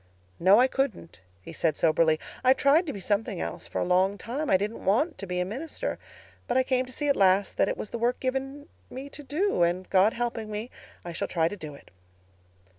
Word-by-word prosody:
"'No, 190 Hz, +5 st, +6 dB
I 250 Hz, -, +6 dB
couldn't,' 265 Hz, -, -2 dB, 0.2 s
he 165 Hz, -, -9 dB
said 160 Hz, -2 st, 0 dB
soberly. 160 Hz, 0 st, +3 dB, 0.2 s
'I 255 Hz, +1 st, +6 dB
tried 285 Hz, +6 st, +3 dB
to -, -, -1 dB
be 200 Hz, -, -7 dB
something 205 Hz, +1 st, -1 dB
else -, -, -5 dB
for -, -, -4 dB
a -, -, +1 dB
long 185 Hz, +3 st, +2 dB
time—I 240 Hz, +1 st, 0 dB
didn't 210 Hz, +4 st, -4 dB
want 295 Hz, -, +1 dB
to 195 Hz, -, -5 dB
be 180 Hz, 0 st, -2 dB
a 180 Hz, -, 0 dB
minister. 300 Hz, -, -5 dB, 0.5 s
But 245 Hz, -, +1 dB
I 260 Hz, -, +4 dB
came 255 Hz, 0 st, 0 dB
to -, -, -10 dB
see 290 Hz, +4 st, -2 dB
at 280 Hz, -, +3 dB
last 195 Hz, +1 st, +3 dB
that -, -, +3 dB
it -, -, -2 dB
was 210 Hz, -, -6 dB
the 235 Hz, -, -4 dB
work 240 Hz, +2 st, 0 dB
given 270 Hz, +3 st, -3 dB, 0.2 s
me 270 Hz, +2 st, -7 dB
to 295 Hz, -, -9 dB
do—and 260 Hz, -, 0 dB
God 195 Hz, +3 st, +4 dB
helping 230 Hz, -2 st, -3 dB
me, 215 Hz, +3 st, -5 dB, 0.3 s
I 175 Hz, -, -5 dB
shall 165 Hz, -, -3 dB
try 165 Hz, -2 st, +1 dB
to 205 Hz, -, -4 dB
do 155 Hz, -6 st, -8 dB
it. -, -, -17 dB
220 Hz, 220 wpm, -27 LUFS, 185-265 Hz, 0.5 s, No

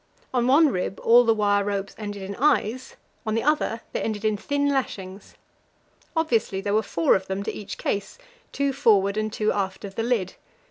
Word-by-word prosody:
On 245 Hz, -1 st, +2 dB
one 295 Hz, +4 st, +6 dB
rib 185 Hz, -3 st, -3 dB
all 240 Hz, +2 st, +6 dB
the 230 Hz, -1 st, +4 dB
wire 205 Hz, -1 st, +2 dB
ropes 200 Hz, -1 st, -3 dB
ended 205 Hz, -2 st, -6 dB
in 200 Hz, +1 st, -6 dB
eyes; 255 Hz, -3 st, +1 dB, 0.3 s
on 220 Hz, -2 st, -1 dB
the 225 Hz, -, 0 dB
other 295 Hz, -6 st, +1 dB
they -, -, -1 dB
ended 215 Hz, -1 st, -3 dB
in 215 Hz, -1 st, +2 dB
thin 285 Hz, +7 st, -1 dB
lashings. 200 Hz, -8 st, -3 dB, 0.8 s
Obviously 235 Hz, -11 st, +1 dB
there 200 Hz, +1 st, -2 dB
were 215 Hz, -, +3 dB
four 170 Hz, -5 st, +2 dB
of 190 Hz, 0 st, -2 dB
them 190 Hz, +1 st, -3 dB
to -, -, -3 dB
each 210 Hz, -, -7 dB
case 200 Hz, 0 st, -3 dB, 0.3 s
two 280 Hz, -1 st, 0 dB
forward 205 Hz, -7 st, +3 dB
and 215 Hz, 0 st, -1 dB
two 215 Hz, 0 st, 0 dB
aft 195 Hz, 0 st, -3 dB
of 195 Hz, -, -8 dB
the 225 Hz, -, -2 dB
lid. 225 Hz, -6 st, 0 dB
215 Hz, 195 wpm, -24 LUFS, 200-245 Hz, 0.8 s, one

